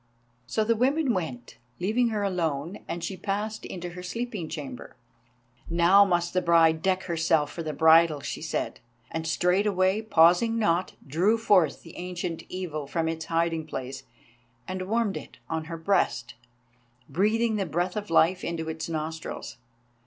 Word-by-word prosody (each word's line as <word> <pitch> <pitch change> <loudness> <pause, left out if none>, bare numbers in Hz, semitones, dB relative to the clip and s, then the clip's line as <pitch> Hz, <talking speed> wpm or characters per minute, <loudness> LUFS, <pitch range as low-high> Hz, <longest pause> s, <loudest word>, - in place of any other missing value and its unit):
So 215 +12 +1
the 230 +2 +2
women 265 +3 +2
went, 130 -10 -5 0.2
leaving 220 +7 +2
her 215 -3 -1
alone, 170 -2 -2
and 170 0 -4
she 195 - -3
passed 205 +4 -3
into 175 -1 -6
her 180 +1 -8
sleeping 205 -2 -4
chamber. 145 -6 -7 0.7
"Now 175 +4 +6
must 175 -2 0
the 185 - +2
bride 165 -2 +4
deck 190 +1 +1
herself 160 -3 +1
for 170 - -6
the 155 -2 -3
bridal," 160 0 +5
she - - -5
said, - - -3 0.3
and 160 0 -3
straightway, 185 +3 +2
pausing 215 +3 +4
not, 185 -4 +1
drew 180 +11 +2
forth 190 -9 +3
the 165 - -13
Ancient 180 -2 -4
Evil 160 -6 -4
from 165 +2 -1
its 160 0 -3
hiding 165 -1 0
place 130 -2 -5 0.7
and 185 +1 -4
warmed 225 -1 0
it - - -10
on 160 -1 -3
her 165 0 -6
breast, 160 -9 0 0.7
breathing 215 +8 +1
the 195 -3 -1
breath 175 +3 -1
of 210 -3 -4
life 165 +2 +3
into 165 -1 -3
its 160 +1 -5
nostrils. 160 -3 -5
175 Hz, 155 wpm, -27 LUFS, 160-200 Hz, 0.7 s, Now